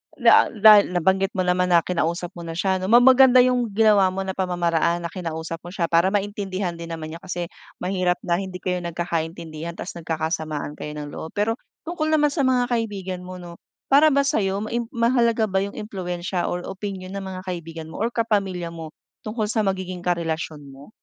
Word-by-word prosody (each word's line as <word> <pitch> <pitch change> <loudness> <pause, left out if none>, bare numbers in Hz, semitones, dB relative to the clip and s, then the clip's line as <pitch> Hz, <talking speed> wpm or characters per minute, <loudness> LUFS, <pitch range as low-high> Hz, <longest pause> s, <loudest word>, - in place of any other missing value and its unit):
da - - +6
dahil 210 -4 +6
nabanggit 190 +4 +1
mo 185 - +1
naman 180 0 +2
na 170 -2 +5
kinausap 175 0 -2
mo 175 - -9
na 165 - -5
siya 190 +1 0
'no, 185 - -3
ma 235 +3 +7
maganda 260 -1 +7
'yung 250 -2 +2
ginawa 210 -3 +5
mo 195 +1 -3
na 190 - -3
pamamaraan 175 -2 0
na 170 - -4
kinausap 165 -2 -5
mo 175 - -11
siya 180 -2 -1
para 170 +3 +4
maintindihan 200 -2 -2
din 170 - -6
naman 155 -1 -7
niya. 165 - -8
Kasi 175 -2 -5 0.3
mahirap 180 -1 +1
na 175 0 +1
hindi 190 -2 -6
kayo 180 -1 -1
nagkakaintindihan 170 -1 -4
tapos, - - -6
nagkakasamaan 160 -2 -3
kayo 150 0 -6
ng 145 -1 -6
loob. 160 - -8
Pero, 225 +3 0 0.3
tungkol 325 -2 -2
naman 295 -2 +3
sa 290 - 0
mga 250 -1 +3
kaibigan 200 -6 -2
mo 185 0 -8
'no, 175 -1 -11 0.3
para 290 +3 +7
ba 280 -1 +3
sayo 200 -9 0
maim 235 +1 -3
mahalaga 235 -1 +2
ba 190 0 0
yung 200 - -6
impluwensiya 180 -3 -3
or 175 0 -3
opinyon 190 -1 -6
ng 195 - -4
mga 185 -1 -6
kaibigan 165 -2 -6
mo - - -9
or 235 - 0
kapamilya 200 -7 -1
mo 160 -2 -8 0.4
tungkol 215 0 -1
sa 225 - 0
magiging 185 -2 -2
karelasyon 165 -3 -2
mo? 140 +8 -14
185 Hz, 195 wpm, -23 LUFS, 170-210 Hz, 0.4 s, ma